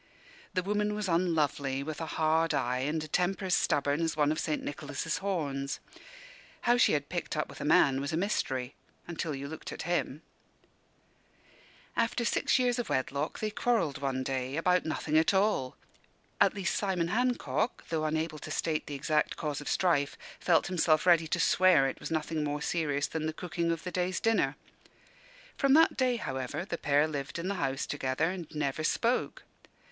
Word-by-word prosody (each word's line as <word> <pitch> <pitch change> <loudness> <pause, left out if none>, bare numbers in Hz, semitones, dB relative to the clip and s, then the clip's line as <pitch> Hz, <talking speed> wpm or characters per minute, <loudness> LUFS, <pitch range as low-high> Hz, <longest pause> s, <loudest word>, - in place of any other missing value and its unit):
The 185 - +1
woman 210 +1 0
was 210 -1 -2
unlovely, 150 -6 +1
with 155 +2 -5
a 160 - -3
hard 160 +1 +1
eye 125 +1 0
and 150 +4 -1
a - - -6
temper 180 +5 0
as 185 - 0
stubborn 145 -4 +2
as 165 -1 -1
one 150 -1 +3
of 155 - -1
St. 155 - -1
Nicholas's 145 +1 -3
horns. 140 -8 -2 0.8
How 240 - +4
she 245 - +4
had 145 -1 0
picked 175 -2 -3
up 150 - 0
with - - -10
a - - -3
man 135 -3 +4
was 140 - -3
a 160 - -1
mystery, 135 -9 -1 0.3
until 165 -3 -3
you 140 +1 -5
looked 160 +2 -7
at - - -6
him. 170 -3 -1 1.7
After 235 +1 0
six - - +2
years 250 -1 +1
of 240 - -3
wedlock 140 +3 -1
they 215 -1 -2
quarrelled 220 - 0
one 130 -2 -1
day, 130 +1 -2
about 180 +2 +2
nothing 155 0 +1
at 165 +5 +2
all: 190 -10 +1 0.6
at - - +4
least, 195 -3 -1
Simon 185 -4 0
Hancock, 245 +1 0
though 160 -2 -1
unable 155 0 -1
to - - -8
state 155 -2 -1
the 145 - -5
exact 150 +2 0
cause 150 -3 -3
of 145 - -5
strife, 145 -6 +1 0.2
felt 165 -3 +3
himself 165 -3 +2
ready 170 -3 +5
to - - -1
swear 180 -7 +5
it 135 - -5
was - - -6
nothing 155 -1 -1
more 150 0 -2
serious 145 -4 0
than 160 -1 -3
the 155 - -2
cooking 170 0 -2
of 165 -2 -3
the 180 - -4
day's 180 0 -1
dinner. 200 -11 +2 1.0
From 275 -1 +4
that 320 +1 +5
date, 250 -3 +1
however, 135 +5 -3
the 170 -3 -4
pair 145 +1 +3
lived 140 -3 -4
in 170 +3 -3
the - - 0
house 135 0 -1
together 145 +3 -1
and 180 -4 -6
never 150 0 -2
spoke. 235 +9 0
160 Hz, 185 wpm, -30 LUFS, 145-185 Hz, 1.7 s, ready